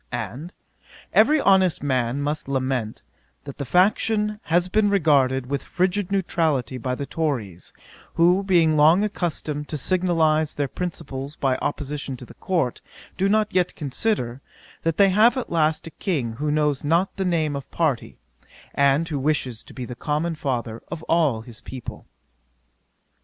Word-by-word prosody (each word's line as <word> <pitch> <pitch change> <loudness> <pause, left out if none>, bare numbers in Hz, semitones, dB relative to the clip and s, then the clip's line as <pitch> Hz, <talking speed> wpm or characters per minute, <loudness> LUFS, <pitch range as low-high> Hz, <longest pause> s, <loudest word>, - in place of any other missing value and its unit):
And, 145 - -5 0.6
'Every 295 +8 +5
honest 190 - +3
man 130 0 0
must 150 0 -2
lament, 130 -5 -2 0.4
that 140 0 -10
the 140 - -3
faction 210 - +2
has 175 +2 +2
been 205 +2 +2
regarded 140 -9 +3
with 140 +2 -2
frigid 185 +1 -1
neutrality 160 -9 0
by 125 +1 -2
the 140 - -4
Tories, 125 - -3 0.4
who 175 +3 +4
being 170 -5 +3
long 160 +6 +5
accustomed 155 -7 -3
to 155 - -3
signalise 160 -2 +1
their 145 -1 -1
principles 145 -5 -5
by 135 -3 +1
opposition 145 -2 -4
to 125 - -10
the - - -14
Court, 170 -10 -1 0.3
do 195 +1 +1
not 215 0 +2
yet 180 -1 +1
consider, 135 - -2 0.4
that 165 -1 -1
they 200 -1 +6
have 220 +7 +5
at 255 - -4
last 155 -2 +1
a 165 - -8
King 145 - -2
who 150 +2 -1
knows 150 -2 +1
not 170 +6 +1
the 195 - -2
name 160 -5 0
of 140 - -6
party, 155 -8 -1 0.6
and 140 +3 +3
who 150 -4 -2
wishes 130 -5 -1
to - - -14
be 125 - -5
the 125 - -7
common 150 +6 -2
father 125 -7 -3
of 165 -2 -6
all 155 -10 +2
his 115 -1 -11
people.' 130 -3 -8
155 Hz, 160 wpm, -23 LUFS, 135-180 Hz, 0.6 s, they